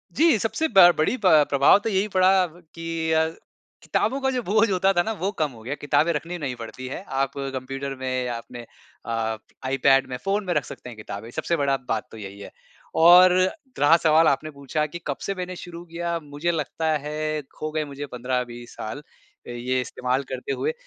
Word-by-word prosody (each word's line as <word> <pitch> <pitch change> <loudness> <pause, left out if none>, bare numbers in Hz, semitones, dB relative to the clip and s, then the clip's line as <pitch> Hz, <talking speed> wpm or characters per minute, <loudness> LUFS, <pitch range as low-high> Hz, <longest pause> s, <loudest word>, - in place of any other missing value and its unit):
जी, 320 -7 +5
सबसे 315 +10 0
ब 175 -2 +9
बड़ी 155 +11 +2
प - - -1 0.2
प्रभाव 140 +6 +6
तो 225 - -3
यही 195 +1 +1
पड़ा 185 0 +5 0.5
कि 165 0 -7 0.3
अ, 160 0 +4 0.6
किताबों 260 +6 0
का 265 - +1
जो 250 -1 -1
बोझ 215 +3 +3
होता 190 +1 +3
था 175 - +3
ना 220 - -2
वह 195 +3 -1
कम 150 -3 +1
हो 115 -2 -14
गया। 135 +5 -3
किताबें 155 +3 +2
रखनी 170 +4 -4
नहीं 135 -5 -4
पड़ती 130 +3 -7
है 155 +8 -6 0.2
आप 135 - -3 0.2
कंप्यूटर 135 +1 -4
में 130 -1 -2
या 120 -1 -3
अपने 120 +1 -9 0.4
अ, 110 -1 -2 0.3
iPad 135 0 +3
में, 125 - -4
फ़ोन 200 +1 0
में 175 - 0
रख 150 -4 +1
सकते 125 - -9
हैं 115 - -11
किताबें, 105 +1 -7
सबसे 170 - -1
बड़ा 140 -2 +1
बात 110 -1 -1
तो 110 - -10
यही 100 -1 -9
है। 100 - -9 0.5
और 180 +1 +9 0.5
रहा 155 +3 +6
सवाल 160 +1 +5
आपने 140 +3 +1
पूछा 140 +2 -2
कि 170 +3 -7
कब 140 - -2
से 195 - -3
मैंने 180 0 -5
शुरू 175 -1 -9
किया, 170 0 -3
मुझे 150 +3 -3
लगता 160 0 -2
है 155 +1 -3 0.2
हो 155 0 -2
गए 155 0 -1
मुझे 140 0 -7
15-20 120 -1 -3
साल 110 +7 -6 0.5
ये 125 +1 -2
इस्तेमाल 125 +2 -2
करते 130 +1 -4
हुए। 465 - -1
150 Hz, 200 wpm, -24 LUFS, 130-175 Hz, 0.6 s, ब